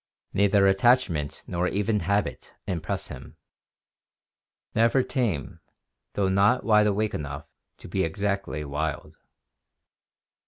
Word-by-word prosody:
Neither 100 0 +4
attachment 95 - +2
nor 90 +1 -1
even 105 +2 0
habit 100 -7 -2
impress 85 -4 -3
him; - - -10 1.4
never 115 +4 +3
tame, 110 - -2 0.5
though 100 -2 +1
not 100 +6 +3
wide 105 -1 +4
awake 105 +1 0
enough 70 0 -5 0.3
to - - -11
be 95 +2 0
exactly 100 -3 -2
wild." 75 +2 -4
100 Hz, 105 wpm, -26 LUFS, 80-105 Hz, 1.4 s, Neither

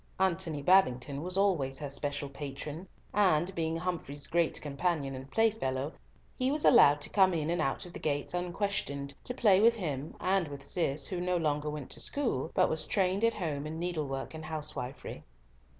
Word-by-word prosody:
Antony 170 -5 0
Babington 140 -6 +3
was 180 +3 0
always 165 -10 +1
her 145 -2 -5
special 145 0 -2
patron, 145 +5 -7 0.3
and 185 -3 +3
being 165 -2 -1
Humfrey's 165 -5 -4
great 170 -1 +1
companion 145 -1 -1
and 130 +1 -8
playfellow, 155 -10 0 0.4
he 255 0 +1
was 295 +2 0
allowed 145 - +7
to - - -1
come 190 -3 +4
in 160 0 -1
and 175 -1 0
out 135 +3 -1
of 175 - -11
the - - -7
gates 145 0 -1
unquestioned, 175 -6 -2
to 250 - -4
play 205 -7 +5
with 230 +1 +6
him 150 -8 -4
and 190 -2 +1
with 140 -1 -8
Cis, 140 0 -1
who 180 -2 -3
no 180 0 +1
longer 150 -2 0
went 150 -3 -6
to - - -3
school, 230 - -1
but - - +5
was 160 - -2
trained 190 +1 +1
at 230 0 +3
home 150 -6 -3
in 160 +1 -5
needlework 155 -6 -3
and 160 0 -7
housewifery. 150 -4 -5
160 Hz, 180 wpm, -31 LUFS, 140-185 Hz, 0.4 s, allowed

